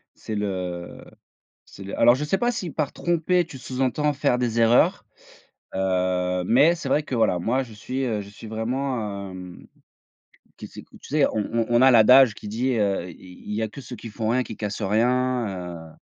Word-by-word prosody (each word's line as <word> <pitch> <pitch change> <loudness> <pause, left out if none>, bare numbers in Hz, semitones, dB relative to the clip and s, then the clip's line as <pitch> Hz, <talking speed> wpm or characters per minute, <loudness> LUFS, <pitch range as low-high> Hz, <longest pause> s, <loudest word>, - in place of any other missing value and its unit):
c'est 110 - -6
le 90 -4 -4 0.6
c'est 100 - -12
le 100 - -6
alors 120 - +6
je 150 - -3
sais 195 +5 0
pas 240 0 +1
si 185 -8 -4
par, 145 -1 -2
tromper, 175 +1 +1
tu 135 -5 -11
sous-entends 130 +4 -1
faire 135 -3 +1
des 120 -1 -1
erreurs, 115 +2 +3 0.7
heu, 90 -1 0
mais 140 - +4
c'est 170 - -6
vrai 150 - +2
que, 130 - -5
voilà, 100 -6 +2
moi 120 +9 0
je 115 -4 -11
suis, 130 +5 -4
heu, 110 -4 -1
je 100 - -9
suis 110 +1 -11
vraiment, 110 -4 -3
hem, 90 -1 -10 0.9
q - - -8
sais - - -11
que - - -20
tu - - -14
sais? 145 -1 +3
On 105 - 0
on 115 -1 +1
on 120 0 +3
a 130 - +7
l'adage 125 0 +7
qui 105 - -10
dit, 125 +5 -1
heu: 100 -4 0
«I 90 +1 -14
il 105 - -3
y 110 - -1
a - - -1
que 125 +6 -10
ceux 125 - -9
qui 115 - -9
font 110 +1 -3
rien 125 +2 +2
qui 110 - -8
cassent 105 0 -4
rien», 125 +4 +1 0.4
heu - - -18
115 Hz, 210 wpm, -24 LUFS, 100-130 Hz, 0.9 s, a